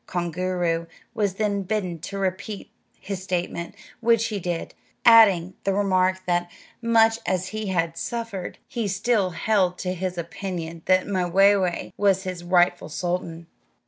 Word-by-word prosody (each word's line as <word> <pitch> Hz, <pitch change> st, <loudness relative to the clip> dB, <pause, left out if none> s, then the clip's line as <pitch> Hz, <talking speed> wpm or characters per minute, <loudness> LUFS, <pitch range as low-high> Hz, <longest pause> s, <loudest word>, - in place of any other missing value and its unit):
Koongooroo 175 Hz, -1 st, -1 dB, 0.3 s
was 200 Hz, -3 st, 0 dB
then 205 Hz, -1 st, 0 dB
bidden 185 Hz, -4 st, -2 dB
to 200 Hz, +5 st, -6 dB
repeat 195 Hz, +2 st, -3 dB, 0.3 s
his 195 Hz, -2 st, -5 dB
statement, 175 Hz, -2 st, -3 dB, 0.2 s
which 230 Hz, -1 st, +3 dB
he 210 Hz, -2 st, -3 dB
did, 175 Hz, -2 st, -4 dB, 0.3 s
adding 200 Hz, -6 st, +7 dB
the 195 Hz, -1 st, +1 dB
remark 185 Hz, -2 st, +1 dB
that, 175 Hz, 0 st, 0 dB, 0.3 s
much 225 Hz, -1 st, +4 dB
as 185 Hz, 0 st, 0 dB
he 215 Hz, -1 st, -4 dB
had 170 Hz, -3 st, 0 dB
suffered, 230 Hz, -6 st, -4 dB
he 230 Hz, -3 st, -2 dB
still 200 Hz, 0 st, +1 dB
held 185 Hz, -1 st, +1 dB
to 180 Hz, -1 st, -2 dB
his 185 Hz, 0 st, -4 dB
opinion 170 Hz, -1 st, -5 dB
that 185 Hz, 0 st, +3 dB
Mwayway 190 Hz, -1 st, +2 dB
was 195 Hz, -2 st, +2 dB
his 185 Hz, -2 st, -5 dB
rightful 175 Hz, -2 st, +2 dB
sultan. 170 Hz, +1 st, -3 dB
185 Hz, 140 wpm, -24 LUFS, 175-205 Hz, 0.3 s, adding